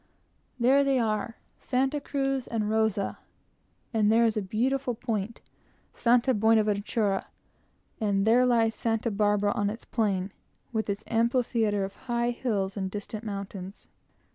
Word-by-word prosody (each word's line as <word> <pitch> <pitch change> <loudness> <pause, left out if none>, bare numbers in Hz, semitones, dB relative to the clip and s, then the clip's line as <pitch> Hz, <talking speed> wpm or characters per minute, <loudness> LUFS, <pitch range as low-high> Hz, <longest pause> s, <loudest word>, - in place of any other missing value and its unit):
There 265 +4 +5
they 275 -1 +2
are, 225 -1 -1 0.2
Santa 270 +3 0
Cruz 270 -2 -1
and 225 -2 -1
Santa 210 +1 -1
Rosa; 220 -3 0 0.7
and 215 -1 +3
there 230 +1 +5
is 225 - +2
the 215 - -1
beautiful 245 +6 -1
point, 225 -2 -3 0.5
Santa 245 +2 +3
Buenaventura; 210 -2 +1 0.7
and 200 -2 +1
there 235 +3 +5
lies 225 -2 +3
Santa 225 +1 -1
Barbara 205 0 +2
on 205 0 0
its 220 +3 -7
plain, 200 -4 -1 0.4
with 220 -1 -1
its 200 +2 -2
amphitheatre 230 -3 +1
of 195 - -8 0.2
high 240 0 +1
hills 205 -6 -2
and 190 -2 -2
distant 210 +2 -6
mountains. 200 -2 -7
220 Hz, 140 wpm, -28 LUFS, 205-240 Hz, 0.7 s, There